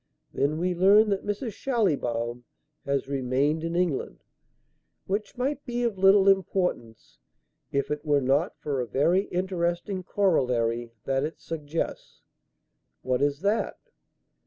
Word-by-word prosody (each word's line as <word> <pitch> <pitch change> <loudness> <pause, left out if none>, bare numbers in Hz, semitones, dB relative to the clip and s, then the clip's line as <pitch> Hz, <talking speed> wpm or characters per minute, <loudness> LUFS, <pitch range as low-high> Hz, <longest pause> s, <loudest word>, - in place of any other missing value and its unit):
Then 145 +3 0
we 180 +2 0
learn 200 +5 +5
that 195 -1 -1
Mrs. 210 +2 -3
Schallibaum 125 - -1 0.4
has 140 -1 0
remained 140 +3 0
in 165 +1 -2
England; 175 -6 -1 0.8
which 205 +5 -3
might 275 +3 -1
be 245 -2 -2
of 225 -5 -1
little 195 +1 +6
importance 180 - 0 0.5
if 140 +1 -1
it 150 0 -2
were 145 -2 +3
not 140 +7 +1
for 140 -3 -2
a 120 - -4
very 175 - +2
interesting 180 +1 -2
corollary 120 - 0
that 135 0 0
it 155 +2 -4
suggests." 160 0 -5 0.8
"What 130 0 0
is 145 +1 +1
that?" 205 +3 0
165 Hz, 130 wpm, -27 LUFS, 135-195 Hz, 0.8 s, little